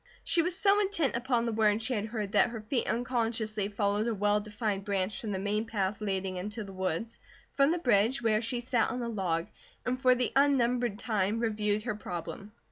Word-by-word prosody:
She 335 - +3
was 350 +2 +3
so 400 +1 +4
intent 380 -11 +1
upon 240 -1 0
the 230 - 0
words 215 0 +2
she 255 - -1
had 215 -2 -2
heard 210 -3 -4
that 215 +2 +4
her 230 -2 -6
feet 230 +3 -1
unconsciously 225 -4 -1
followed 205 +1 0
a 230 - 0
well 205 +1 +2
defined 210 -1 -3
branch 200 +3 -2
from 220 -4 -4
the 195 - -1
main 205 +3 -1
path 205 -2 -2
leading 190 -2 -2
into 210 +4 -4
the 195 -1 -10
woods, 190 +4 -3 0.3
from 275 0 +4
the 345 - +1
bridge, 240 - +3
where 220 -2 +2
she 240 +1 -2
sat 240 -2 +1
on 250 -1 -3
a 235 - -3
log, 175 -6 -1 0.4
and 255 +1 -1
for 255 -1 +5
the 250 0 0
unnumbered 250 -5 +2
time, 215 -2 0
reviewed 210 -2 0
her 235 -2 -2
problem. 200 +1 -6
220 Hz, 210 wpm, -30 LUFS, 205-245 Hz, 0.4 s, for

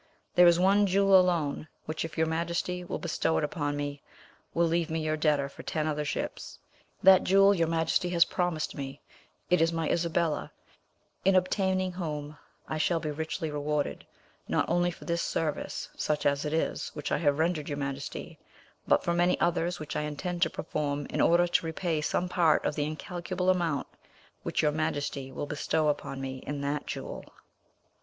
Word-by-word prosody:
There 180 -1 +7
is 170 0 +5
one 200 +2 +4
jewel 195 +1 +4
alone 165 -5 0 0.2
which, 155 0 -3
if 165 0 -7
your 160 - +3
Majesty 170 +2 -2
will 175 - -4
bestow 165 -1 0
it - - 0
upon 145 -1 -2
me, 145 -1 -4 0.5
will 170 - +2
leave 170 0 0
me 160 0 -1
your 155 0 0
debtor 150 -3 +2
for 140 - -11
ten 155 -1 -2
other 150 -1 -1
ships. - - -4 0.5
That 190 0 +8
jewel 195 +1 +6
your 170 -4 +1
Majesty 165 +2 +1
has 170 -1 +5
promised 175 -4 -1
me: 135 0 -6 0.5
it 180 - +5
is 165 0 +3
my 165 -1 -1
Isabella, 170 -2 0 0.7
in 195 0 +4
obtaining 185 0 +1
whom 150 -4 -5 0.3
I 155 - -3
shall 165 +2 +2
be 155 -1 -3
richly 160 +1 -3
rewarded, 150 0 -2 0.4
not - - +1
only 175 +1 +2
for 175 - -9
this 170 0 0
service, 155 -2 -2
such 150 -1 -1
as 140 +1 +2
it 150 - -2
is, 160 - -1
which 150 - -4
I - - +2
have 145 -3 +2
rendered 160 -2 0
your 145 - -3
Majesty, 140 0 -5 0.5
but - - +4
for 170 - +1
many 175 +1 +2
others 175 +1 +1
which 155 -1 -6
I - - 0
intend 170 +4 -4
to 165 - +4
perform 145 -2 -3
in - - 0
order 175 +1 +5
to 175 - +1
repay 160 -1 -1
some 175 +4 0
part 170 -4 +3
of - - +1
the 145 -1 -1
incalculable 180 +4 -1
amount 170 -6 0 0.6
which - - -1
your 150 - +4
Majesty 145 -3 -2
will 140 - -4
bestow 150 +1 0
upon 145 -2 -3
me 130 -1 -4
in 145 -1 -3
that 145 +1 -2
jewel." - - -5
160 Hz, 185 wpm, -29 LUFS, 150-175 Hz, 0.7 s, That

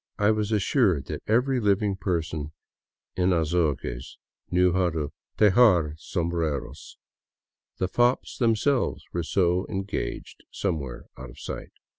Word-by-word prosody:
I 105 +1 +4
was 105 0 -1
assured 100 - +2
that - - -4
every 125 +4 +2
living 100 -2 +1
person 80 -5 -3 0.6
in 90 0 +2
Azogues 75 -7 -1 0.3
knew 90 0 +3
how 90 -1 +2
to 80 -3 -3 0.3
tejar 100 -7 +5
sombreros. 80 -6 -3 0.8
The 95 - 0
fops 120 +6 +1
themselves 120 +3 +1
were 85 - 0
so 90 +1 +1
engaged 95 -1 -4
somewhere 75 -10 -3
out 65 -1 -8
of - - -14
sight. - - -7
90 Hz, 120 wpm, -26 LUFS, 80-105 Hz, 0.8 s, tejar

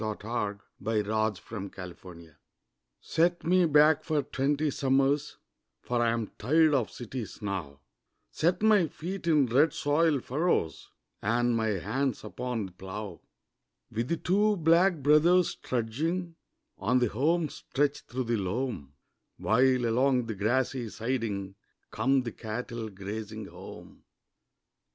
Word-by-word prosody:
THE 110 -1 -2
SHAKEDOWN 105 -2 -3 0.5
ON 110 0 +2 0.4
THE 90 -2 -9
FLOOR 85 -4 -14 0.6
Set 170 +2 +1
me 180 +1 +4
back 150 +1 +5
for 150 -2 0
twenty 145 +3 0
summers 135 +2 +1 0.5
For 120 -1 0
I'm 115 -2 0
tired 155 +7 +4
of 125 -6 +1
cities 120 -1 -7
now 85 -9 -4 0.5
Set 180 +5 0
my 210 -6 +5
feet 175 +3 -6
in 150 -4 +4
red 140 +6 +3
soil 150 0 +2
furrows 135 - -1 0.3
And 120 +3 +1
my 110 -1 0
hands 110 +6 -1
upon 120 0 -3
the 95 - -10
plough, 95 -1 -7 0.7
With 115 +2 -2
the 170 - 0
two 205 +5 +2
'Black 170 +3 +4
Brothers' 160 +5 +5
trudging 160 +10 -2 0.5
On 110 +6 +2
the 125 - +3
home 155 +9 +1
stretch 145 +2 -1
through 130 +1 -3
the 120 -1 0
loam 95 - -3 0.4
While, 125 +5 +3
along 125 +2 +2
the 115 - -3
grassy 120 +4 0
siding, 110 -4 -3 0.4
Come 130 +4 +2
the 120 - -4
cattle 115 +1 -5
grazing 105 +2 -6
home. - - -12
125 Hz, 125 wpm, -29 LUFS, 110-150 Hz, 0.7 s, back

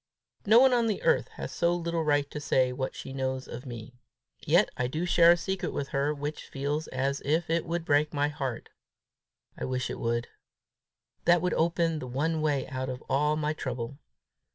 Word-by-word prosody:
No 220 +3 +8
one 260 0 +6
on 235 -2 +3
the 215 - -2
earth 485 -1 +3
has - - -6
so 170 0 +1
little 170 -1 -1
right 145 -2 +2
to 150 - -4
say 130 -3 +2
what 130 +1 -3
she 135 - -7
knows 130 -1 -2
of 125 +3 -8
me. 120 0 -8 0.5
Yet - - +4
I 125 - 0
do 155 +7 -2
share 170 -1 +6
a - - -1
secret 190 +3 -3
with 140 - -3
her 140 +2 0
which 150 +1 -5
feels 145 +3 -2
as 135 +1 -1
if 160 +4 0
it 165 0 0
would 170 0 -2
burst 150 -1 +3
my 145 0 +1
heart. 135 -5 -4 0.9
I - - -4
wish 130 -1 -2
it - - -6
would. 120 0 -1 1.0
That 175 0 +4
would 180 - +1
open 165 -1 +1
the 130 - -6
one 155 +6 -1
way 145 -3 0
out 130 -1 -3
of 125 0 -6
all 150 +2 +2
my 155 0 -1
trouble. 130 -1 -5
145 Hz, 200 wpm, -28 LUFS, 130-165 Hz, 1.0 s, No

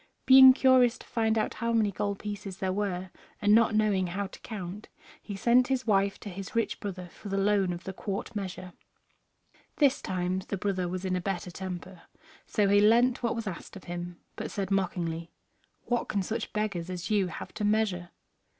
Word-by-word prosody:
Being 260 0 +10
curious 255 -2 +4
to - - -14
find 225 -1 0
out 215 - 0
how 235 +1 -2
many 220 -3 +2
gold 200 +1 -2
pieces 200 -2 -6
there 190 -1 -1
were, 190 -2 -2 0.3
and 205 0 +4
not 225 -1 +5
knowing 205 -4 +2
how 195 +3 -3
to 195 - -11
count, 200 -1 -7 0.3
he 205 - -7
sent 245 +5 +4
his 260 -1 -1
wife 200 -2 +2
to 205 - -7
his 195 +2 -8
rich 230 - 0
brother 185 -3 -6
for 205 - -10
the 195 - -1
loan 195 -2 +2
of 175 +1 -7
a 190 - -3
quart 200 +3 -5
measure. 185 -2 -5 1.0
This 280 -3 +3
time 185 0 -1
the 200 - -3
brother 185 -2 -1
was 185 +1 -4
in 185 -1 0
a 180 - -1
better 180 -1 -3
temper, 180 -1 -7 0.5
so 210 -2 +2
he 200 +1 +5
lent 235 +4 +4
what 235 -1 0
was 230 -1 -4
asked 185 -1 -7
of 195 - -10
him, 175 0 -6 0.2
but - - -5
said 200 -2 -4
mockingly, 170 -4 -1 0.6
"What 240 -1 -1
can 200 -2 0
such 225 +4 -4
beggars 200 -5 -2
as 180 +2 -5
you 200 -3 +3
have 165 - -8
to 215 - -4
measure?" 205 -4 +1
200 Hz, 195 wpm, -29 LUFS, 185-215 Hz, 1.0 s, Being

